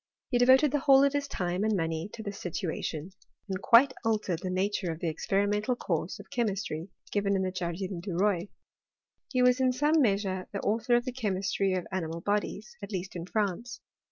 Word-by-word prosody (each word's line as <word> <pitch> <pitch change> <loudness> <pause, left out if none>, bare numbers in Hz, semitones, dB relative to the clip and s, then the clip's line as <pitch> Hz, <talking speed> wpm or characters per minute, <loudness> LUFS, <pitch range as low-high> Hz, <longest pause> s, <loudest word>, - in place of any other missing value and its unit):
He 245 - +3
devoted 260 +3 +6
the 295 - +1
whole 275 0 +6
of 280 0 +3
his 285 -1 -1
time 180 -4 -2
and 215 -2 +2
money 165 +2 -2
to 220 - -7
this 200 -1 -6
situation, 170 -1 -3 0.4
and 190 -1 -3
quite 260 +5 +6
altered 210 -7 0
the 185 - -4
nature 185 -1 0
of 160 - -6
the 170 - -1
experimental 205 +7 0
course 170 -6 -2
of 205 - -11
che 240 - +1
mistry 190 -5 -3 0.2
given 200 -1 +1
in 190 - +1
the 185 - -1
Jardin 180 +1 -3
du 180 0 -5
Roi. 195 -1 +1 0.8
He 255 -2 +2
was 250 +1 +4
in 260 -1 +3
some 295 +5 +3
measure 195 -5 0
the 200 - -3
author 225 +3 +2
of 240 +1 +1
the 255 - -2
chemistry 195 -4 0
of 180 - -2
animal 165 -3 -3
bodies, 210 +2 -2
at 200 +1 -7
least 185 -2 -4
in 170 0 -5
France. 215 +4 -2
200 Hz, 200 wpm, -29 LUFS, 185-240 Hz, 0.8 s, devoted